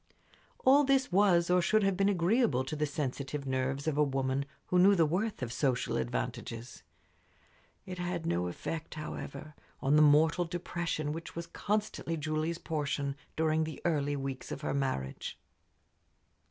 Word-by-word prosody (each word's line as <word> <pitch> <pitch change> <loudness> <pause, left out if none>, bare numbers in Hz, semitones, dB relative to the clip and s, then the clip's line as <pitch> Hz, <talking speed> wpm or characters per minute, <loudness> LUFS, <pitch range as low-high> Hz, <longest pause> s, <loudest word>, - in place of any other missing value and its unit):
All 275 +3 +7
this 270 -3 +2
was 180 -3 +4
or 180 0 +5
should 215 +5 +3
have 195 -1 +2
been 195 +1 +3
agreeable 180 - +2
to 145 +4 -4
the 150 0 0
sensitive 140 0 -3
nerves 135 +2 -1
of 150 -2 0
a - - +6
woman 135 0 0 0.2
who 180 - +2
knew 200 +2 +7
the 165 -3 +4
worth 185 - -1
of 120 -1 -4
social 130 -3 0
advantages. 65 - -4 1.0
It 180 -1 -7
had 175 -2 -3
no 90 - 0
effect, 155 - -5
however, 150 -1 -6 0.3
on 145 +2 +3
the - - +7
mortal 160 +4 +5
depression 170 -3 -3
which 165 +1 -7
was 170 0 -4
constantly 205 -2 -2
Julie's 155 +2 -1
portion 145 -4 -2 0.2
during 160 0 +2
the 155 -2 -5
early 145 -4 +1
weeks 135 -1 -5
of - - -5
her 150 - -2
marriage. 130 - -3
155 Hz, 155 wpm, -31 LUFS, 140-175 Hz, 1.0 s, All